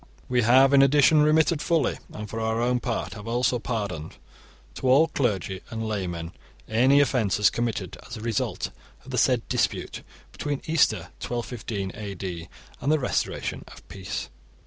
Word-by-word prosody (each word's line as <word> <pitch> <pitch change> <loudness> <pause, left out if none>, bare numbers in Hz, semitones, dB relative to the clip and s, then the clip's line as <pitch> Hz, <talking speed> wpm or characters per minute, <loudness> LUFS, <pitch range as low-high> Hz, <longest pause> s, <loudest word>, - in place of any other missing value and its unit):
We 125 -1 +2
have 130 +4 +5
in 140 - +7
addition 145 +3 +5
remitted 155 +1 +3
fully, 165 -4 +1
and 105 0 -7
for 115 +2 -5
our 110 0 0
own 125 +1 +1
part 120 -2 -3
have 105 0 -9
also 120 +1 +1
pardoned, 100 -10 -4 0.6
to 130 - -2
all 150 +6 +5
clergy 100 - -1
and 110 -2 -4
laymen 90 -5 -3 0.4
any 130 +6 +4
offences 110 -7 +2
committed 110 -6 -3
as 120 - -6
a - - -8
result 115 -2 -2 0.3
of - - -10
the - - +1
said - - +2
dispute - - -1 0.3
between 145 -2 -4
Easter 160 -2 +2
1215 115 -5 -4
AD 95 -5 -6 0.3
and 145 - +1
the 155 - +4
restoration 130 - -2
of - - -14
peace. 95 -1 -5
120 Hz, 155 wpm, -25 LUFS, 105-135 Hz, 0.6 s, in